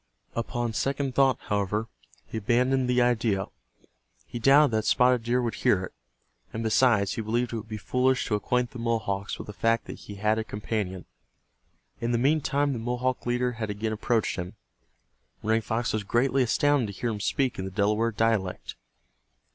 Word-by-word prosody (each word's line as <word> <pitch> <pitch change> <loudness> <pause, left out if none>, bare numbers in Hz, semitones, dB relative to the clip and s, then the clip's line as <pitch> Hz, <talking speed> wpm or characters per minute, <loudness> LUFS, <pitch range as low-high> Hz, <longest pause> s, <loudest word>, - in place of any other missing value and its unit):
Upon 120 0 -2
second 135 +2 -1
thought, 135 0 +4
however, 105 +2 -1 0.4
he 110 - -5
abandoned 125 +4 +2
the 125 0 +4
idea. 110 -5 +1 0.8
He 120 - -6
doubted 140 +3 +6
that 110 -1 0
Spotted 125 -1 +4
Deer 120 +2 0
would 115 - -1
hear 105 -7 +2
it, - - -7 0.6
and 110 - -4
besides, 110 -3 +3
he 115 - -3
believed 120 +2 -1
it - - -1
would 110 0 -7
be 110 -1 -5
foolish 125 +4 +1
to - - -2
acquaint 120 +4 0
the 125 - -8
Mohawks 110 -4 -2
with - - -7
the 105 - -8
fact 115 +2 +1
that - - -8
he 105 - -10
had 105 +2 +1
a - - -1
companion. 105 -4 -4 0.9
In 120 +1 -1
the - - +3
meantime 145 +1 +1
the 120 - -4
Mohawk 125 +2 -2
leader 125 +1 +1
had 110 -2 -4
again 110 +2 -2
approached 110 +1 0
him. 90 +3 -5 0.9
Running 110 +1 +2
Fox 115 +2 -2
was 110 -1 -1
greatly 130 +6 +2
astounded 135 +1 +2
to - - -13
hear 120 - -1
him 105 - -4
speak 130 +3 0
in 95 - -3
the - - -4
Delaware 105 +4 +1
dialect. 110 -4 -1
115 Hz, 180 wpm, -27 LUFS, 105-125 Hz, 0.9 s, doubted